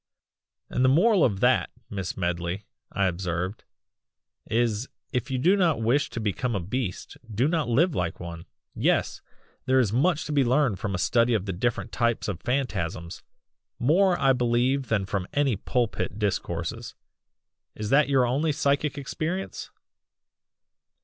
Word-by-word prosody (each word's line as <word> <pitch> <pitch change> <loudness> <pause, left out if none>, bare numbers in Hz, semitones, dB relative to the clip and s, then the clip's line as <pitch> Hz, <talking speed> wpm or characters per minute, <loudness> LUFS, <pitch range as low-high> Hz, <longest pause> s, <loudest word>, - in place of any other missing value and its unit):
"And 125 - -1
the 130 - +5
moral 185 - +4
of 100 -4 +1
that, 125 +1 +3 0.2
Miss 95 -3 -5
Medley," 90 +2 -2 0.3
I 100 0 +1
observed, 90 +2 -2 0.8
"is 115 +1 0 0.2
if 125 -3 -1
you 130 - -1
do 175 +10 +4
not 170 - +2
wish 130 +6 +2
to - - -5
become 110 +3 -1
a - - 0
beast 100 +2 -4
do 115 +6 +1
not 160 -5 0
live 160 +9 +3
like 85 -7 -2
one! 85 -1 -8 0.3
Yes! - - 0 0.5
there 130 0 +4
is 110 -5 +1
much 155 +6 +2
to - - -5
be 145 -2 +3
learned 125 -4 +2
from 105 -4 -2
a - - -1
study 115 +6 +2
of 100 -3 -1
the 95 - -3
different 115 +4 -2
types 120 -1 0
of 100 -6 -4
phantasms 95 -10 -2 0.6
more 175 +8 +3
I 135 -1 +4
believe 125 +2 +1
than 100 -4 0
from 95 -1 -3
any 140 -5 +2
pulpit 115 0 -2
discourses. 85 -5 -3 0.8
Is 105 0 -4
that 140 +1 +4
your 135 -3 +4
only 140 +6 +1
psychic 140 -1 0
experience?" 160 +6 -4
120 Hz, 155 wpm, -26 LUFS, 100-140 Hz, 0.8 s, the